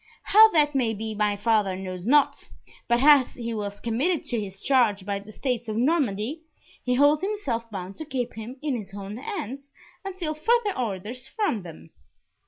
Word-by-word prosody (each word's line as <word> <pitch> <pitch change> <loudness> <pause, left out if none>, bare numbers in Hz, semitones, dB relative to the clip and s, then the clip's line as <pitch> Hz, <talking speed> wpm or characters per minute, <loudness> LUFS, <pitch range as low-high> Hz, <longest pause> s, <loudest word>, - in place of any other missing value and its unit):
How 440 +2 +7
that 300 -5 +3
may 240 -5 +1
be 220 +1 -4
my 210 -1 0
father 205 -3 +1
knows 185 0 -6
not, 290 +2 +3 0.4
but 240 +2 +2
as 285 -4 +6
he 235 -1 -4
was 205 -2 -4
committed 275 +10 0
to 240 - 0
his 195 -1 -7
charge 225 -8 +2
by 200 0 -2
the 205 +2 -12
states 245 0 -3
of 215 - -2
Normandy, 260 -1 0 0.4
he 250 0 +1
holds 290 +3 +4
himself 280 - -3
bound 195 -2 -7
to 315 - -6
keep 260 -5 -3
him 225 +4 -8
in 290 -4 0
his 200 -4 -7
own 200 +1 -6
hands 275 - -6 0.3
until 365 -5 -3
further 425 +6 +1
orders 235 +2 -4
from 400 - -1
them." 80 - -12
240 Hz, 180 wpm, -25 LUFS, 205-295 Hz, 0.4 s, How